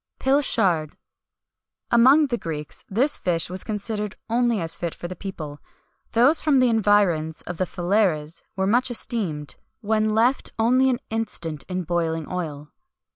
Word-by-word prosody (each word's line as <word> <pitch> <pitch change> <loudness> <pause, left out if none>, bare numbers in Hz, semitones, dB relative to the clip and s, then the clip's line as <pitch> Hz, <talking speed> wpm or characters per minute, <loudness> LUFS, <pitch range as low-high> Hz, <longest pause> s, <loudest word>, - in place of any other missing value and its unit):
[XXI - - -18
200] 265 - +2
PILCHARD. 175 - +2 0.9
Among 260 +6 +6
the 250 -4 -2
Greeks 150 -2 -6
this 255 +9 +2
fish 170 -1 0
was 185 0 -4
considered 210 -1 -4 0.2
only 240 -2 +2
as 165 -2 +2
fit 170 -2 -4
for 175 - -7
the 185 - -7
people. 155 -6 -7 0.5
Those 255 +7 +4
from 300 -3 +3
the 255 -1 +4
environs 200 -8 +2
of 180 - -6
Phaleres 175 -3 0
were 190 0 0
much 245 +6 +2
esteemed, 185 -11 -3 0.2
when 215 0 +1
left 245 +4 +1
only 255 +4 +3
an 250 - -1
instant 170 -9 -2
in 180 0 -2
boiling 165 -2 -2
oil. 150 -5 -5
195 Hz, 150 wpm, -23 LUFS, 165-235 Hz, 0.9 s, Among